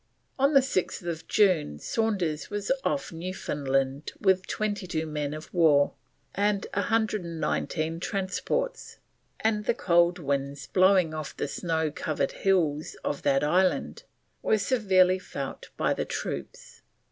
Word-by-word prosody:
On 280 +2 +3
the 275 - +8
6th 175 - -2
June 180 - +3
Saunders 185 - -1
was 205 +2 -2
off 280 - -1
Newfoundland 140 -5 -2
with 190 -2 +2
22 195 -6 -2
men 150 -2 -3
of 155 +1 -8
war 155 -5 +4 0.4
and 200 0 +1
119 170 -6 -1
transports, 200 - -2 0.4
and 210 -1 +1
the - - +2
cold 175 -4 +3
winds 140 -3 -2
blowing 185 -3 +4
off 155 -2 -6
the - - -1
snow 160 +1 -1
covered 155 0 -1
hills 160 -6 +1
of 145 - -2
that 135 0 +2
island 185 - +1 0.4
were 220 - +3
severely 190 -5 +3
felt 140 -6 -6
by - - +2
the - - -2
troops. - - -6
175 Hz, 125 wpm, -27 LUFS, 155-200 Hz, 0.4 s, the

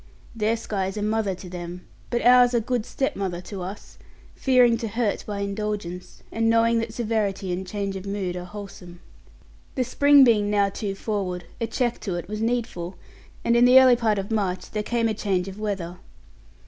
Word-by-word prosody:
Their 225 +1 +1
sky 195 -4 -2
is 195 - -5
a 210 - -2
mother 215 -2 0
to 185 +1 -11
them; 175 0 -7 0.2
but 240 - -1
ours 245 0 +6
a - - +4
good 235 0 -2
stepmother 195 -9 -2
to 185 +1 -7
us 190 +3 -8 0.3
fearing 250 -3 +4
to 230 -1 -4
hurt 225 -1 -1
by 205 -1 -3
indulgence, 200 -3 -4
and 225 0 +1
knowing 230 0 +3
that 225 0 -3
severity 215 -5 -1
and 185 +1 -4
change 200 0 -3
of 190 +1 -6
mood 195 -3 -3
are 180 0 -5
wholesome. 180 -3 -10 0.8
The 255 - +1
spring 285 +3 +6
being 215 -5 +4
now 205 -1 +2
too 200 0 -4
forward, 195 -4 -3 0.2
a 230 - -1
check 240 +1 -1
to 190 -4 -3
it 175 - -5
was 215 +2 -4
needful; 225 -7 -2 0.5
and 235 - +3
in 240 +1 +6
the 255 +1 +8
early 255 -2 +7
part 225 -3 +1
of 195 +2 -4
March 195 -4 -1
there 210 - -1
came 230 +1 0
a 220 - 0
change 195 -3 -1
of 195 +1 -8
weather. 190 -5 -3
210 Hz, 195 wpm, -24 LUFS, 190-230 Hz, 0.8 s, the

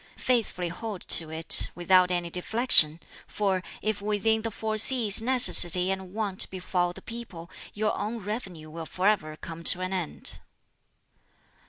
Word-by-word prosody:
Faithfully 220 -8 -2
hold 200 +2 -7
to 160 -2 +2
it, 160 +1 +5
without 180 +1 +3
any 175 -1 -1
deflection; 180 -5 +4 0.3
for 195 -3 -2 0.2
if 215 -1 -2
within 215 +2 0
the 225 - -4
four 220 0 -5
seas 220 -2 +4
necessity 190 -7 +2
and 190 -1 -6
want 205 -2 -2
befall 180 -1 -2
the 190 +2 -13
people, 190 -7 -10 0.2
your 215 +1 -1
own 215 +3 -4
revenue 190 -7 -7
will 165 0 -8
forever 185 -5 -1
come 165 0 -9
to 175 - +4
an 185 +1 -3
end." 175 -5 -3
190 Hz, 145 wpm, -26 LUFS, 175-215 Hz, 0.3 s, it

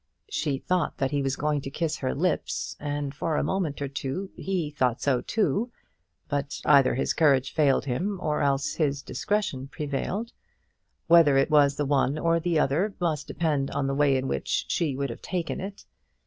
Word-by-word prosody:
She 145 - -1
thought 180 +4 -1
that 135 -2 0
he 145 -1 0
was 135 0 0
going 150 -1 0
to 135 - -6
kiss 155 +2 -2
her 130 - -2
lips, 175 +3 -1
and 145 -1 -3
for 155 +2 -2
a - - +1
moment 165 -7 -1
or - - -1
two 140 +8 -4
he 180 -6 -2
thought 125 -4 0
so 130 -4 +1
too; 225 +2 0 0.6
but 145 0 -2
either 140 -4 +5
his 130 - 0
courage 140 -5 +3
failed 145 -4 +3
him 180 +10 -1
or 150 -4 -1
else 140 0 +1
his 140 -3 0
discretion 140 -2 -2
prevailed. 150 +11 -3 0.7
Whether 165 -5 +6
it 135 +3 +2
was 145 -2 +5
the 145 - -1
one 140 +1 +1
or 165 +1 +2
the 170 0 0
other, 165 +9 +1
must 155 -5 -1
depend 150 -5 0
on 140 0 -1
the 135 - 0
way 140 -1 +3
in 130 +1 -2
which 70 - -1
she 155 -6 0
would 140 -1 -2
have - - -9
taken 175 -3 -3
it. 195 +1 -7
145 Hz, 190 wpm, -26 LUFS, 135-170 Hz, 0.7 s, Whether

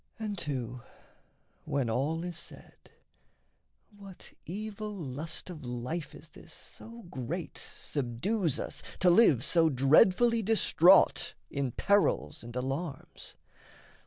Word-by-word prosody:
And 215 -2 -4
too, 125 - -4 0.8
when 140 -4 -1
all 145 +9 -1
is 175 -1 -5
said, 170 - -11 1.2
What 195 -2 -13
evil 210 +3 -5
lust 160 +2 -6
of 155 -4 -10
life 125 +6 -5
is 155 - -13
this - - -15
so 230 +1 -12
great 165 +1 -6 0.2
Subdues 150 - -1
us - - -5 0.2
to 180 -1 +4
live, 170 - +5
so 165 -2 +3
dreadfully 180 - +4
distraught 195 -4 +4 0.2
In 140 -3 -2
perils 200 - +1
and 120 +1 -10
alarms? 135 +3 -5
165 Hz, 110 wpm, -30 LUFS, 135-200 Hz, 1.2 s, live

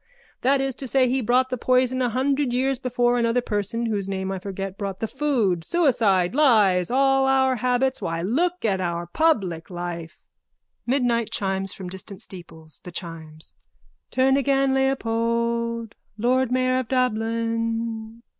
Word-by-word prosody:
That 270 +2 +3
is 270 0 -1
to 265 - -4
say 260 0 +3
he 260 +2 +1
brought 255 +3 +2
the 255 - -2
poison 255 +1 +2
a 245 - +2
hundred 270 +2 0
years 260 +1 0
before 245 -1 +1
another 230 +1 +2
person 220 0 -2
whose 205 -4 -2
name 190 0 -2
I 190 - -3
forget 195 0 -5
brought 200 -2 -5
the 225 - -2
food. 235 - 0
Suicide. 225 - +2
Lies. 210 - +4
All 270 +1 +3
our 265 -1 +3
habits. 250 +2 0
Why, 165 0 -2
look 340 - 0
at 195 -3 +1
our 170 -1 -2
public 190 - 0
life! 175 -1 -6 0.6
(Midnight 240 -3 +1
chimes 195 -1 -1
from 190 - -7
distant 190 +1 -6
steeples.) 165 -6 -7
THE 180 - -8
CHIMES: 160 -3 -7 0.6
Turn 265 +1 +3
again, 275 -1 +2
Leopold! 235 -3 0 0.2
Lord 250 +3 +1
mayor 255 0 +2
of 255 - -4
Dublin! 230 -1 -1
230 Hz, 150 wpm, -24 LUFS, 195-260 Hz, 0.6 s, Lies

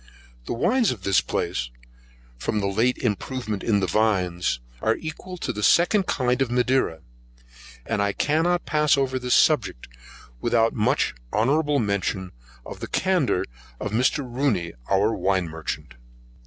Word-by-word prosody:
The - - -2
wines 225 - +2
of 110 -7 -4
this 100 -1 +3
place, - - -2 0.7
from 105 - -1
a - - +1
late 110 +6 +1
improvement 110 -1 -3
in 105 -3 +1
the - - +2
vines, 90 - +1 0.2
are 110 - +2
equal 165 +3 -7
to 125 - -3
the 105 - -5
second 185 - +4
kind 125 -1 0
of 135 - +1
Madeira, 125 -9 +1 0.8
and 100 - -1
I 100 0 +1
cannot 165 - +1
pass 150 -1 +3
over 130 -1 0
this 125 -1 +1
subject 110 - +2 0.5
without 115 - +2
making 105 - 0
honourable 145 +7 +2
mention 100 -4 -1 0.3
of - - -8
the - - -5
candour 180 - +1 0.3
of 105 - -4
Mr. 130 +5 +1
Rooney 120 -9 -1 0.2
our 100 +3 +3
wine 95 -4 0
merchant. 80 -1 -6
115 Hz, 145 wpm, -24 LUFS, 100-140 Hz, 0.8 s, second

